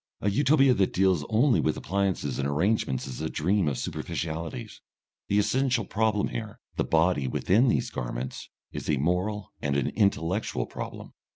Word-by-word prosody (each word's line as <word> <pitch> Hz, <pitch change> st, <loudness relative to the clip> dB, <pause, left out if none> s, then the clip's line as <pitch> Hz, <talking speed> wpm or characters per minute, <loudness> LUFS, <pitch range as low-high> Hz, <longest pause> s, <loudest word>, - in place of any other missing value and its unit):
A 100 Hz, -, 0 dB
Utopia 135 Hz, +3 st, +4 dB
that 100 Hz, -6 st, +1 dB
deals 95 Hz, -5 st, +3 dB
only 120 Hz, +3 st, +4 dB
with 75 Hz, -, 0 dB
appliances 95 Hz, -8 st, -1 dB
and 70 Hz, -, 0 dB
arrangements 75 Hz, -, 0 dB
is 65 Hz, -, -6 dB
a -, -, -2 dB
dream 90 Hz, +3 st, +1 dB
of 70 Hz, -4 st, 0 dB
superficialities; 80 Hz, -4 st, -4 dB, 0.5 s
the 100 Hz, -, +1 dB
essential 120 Hz, +2 st, +2 dB
problem 105 Hz, 0 st, +1 dB
here, 110 Hz, -3 st, -6 dB, 0.2 s
the -, -, +1 dB
body 80 Hz, -4 st, +2 dB
within 105 Hz, -, +3 dB
these -, -, +1 dB
garments, -, -, -5 dB, 0.2 s
is -, -, -6 dB
a 75 Hz, -, +2 dB
moral 90 Hz, +7 st, -1 dB
and 70 Hz, -1 st, 0 dB
an 70 Hz, -, 0 dB
intellectual 90 Hz, -, 0 dB
problem. -, -, -7 dB
95 Hz, 160 wpm, -27 LUFS, 75-110 Hz, 0.5 s, Utopia